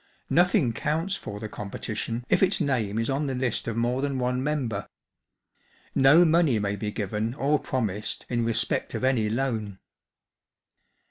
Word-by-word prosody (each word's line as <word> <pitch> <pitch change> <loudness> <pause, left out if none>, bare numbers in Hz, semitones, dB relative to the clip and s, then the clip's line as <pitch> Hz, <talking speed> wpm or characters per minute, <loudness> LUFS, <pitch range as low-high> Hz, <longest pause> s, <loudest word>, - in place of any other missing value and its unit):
Nothing 175 - +3
counts 160 - -1
for 105 - -7
the 110 - -5
competition 110 +3 -5
if - - +2
its 195 0 +3
name 115 -7 0
is 115 0 0
on 140 +2 0
the 135 - -2
list 125 -3 -1
of 115 -1 -2
more 120 +3 +1
than 140 -1 -1
one 125 0 0
member. 125 -9 -2 1.0
No 145 +6 +6
money 160 -6 +3
may 100 -1 -1
be 105 +1 -3
given 105 +3 -2
or 145 +1 +2
promised 105 -5 -3
in 120 -1 0
respect 115 0 0
of - - -3
any 125 -5 +2
loan." 110 -5 -2
120 Hz, 155 wpm, -26 LUFS, 110-140 Hz, 1.0 s, No